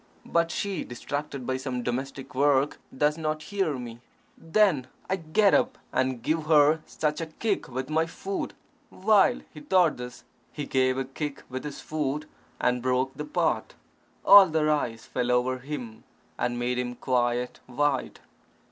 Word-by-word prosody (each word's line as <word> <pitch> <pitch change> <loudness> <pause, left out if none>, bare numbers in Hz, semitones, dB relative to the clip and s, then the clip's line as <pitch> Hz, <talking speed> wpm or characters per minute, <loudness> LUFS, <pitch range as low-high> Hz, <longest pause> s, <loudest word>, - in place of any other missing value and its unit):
But 170 0 +1
she, 195 -2 -2
distracted 140 +2 -5
by 130 +1 -1
some 130 -2 -3
domestic 130 +3 -4
work, 140 +1 +2 0.2
does 150 +3 +2
not 155 0 -2
hear 190 -8 -1
me. 120 -2 -8 0.4
Then 165 -6 +2 0.2
I 190 - 0
get 190 +5 +3
up, 255 -1 +2 0.2
and 130 -2 0
give 155 +2 0
her 155 0 +5
such 150 +1 -1
a 165 - -3
kick 200 +6 -2
with 130 +1 -4
my 160 +1 +1
foot." 195 +4 -4 0.3
While 205 +1 +3
he 155 - -9
thought 175 +1 +3
this, 125 0 -8 0.3
he 145 - -5
gave 130 -1 +2
a 135 - -1
kick 140 +2 -5
with 130 +1 -4
his 150 -1 -6
foot, 150 -1 -2 0.3
and 125 0 +1
broke 130 +1 +1
the 150 - -6
pot. 150 - -1 0.5
All 200 -1 +10
the 155 -2 +1
rice 125 -7 0
fell 125 -1 -2
over 125 +1 +2
him, 125 -5 -7 0.3
and 120 0 -1
made 125 +1 -1
him 125 -1 -3
quite 125 -1 0
white. 135 +1 -1
145 Hz, 160 wpm, -27 LUFS, 125-160 Hz, 0.5 s, All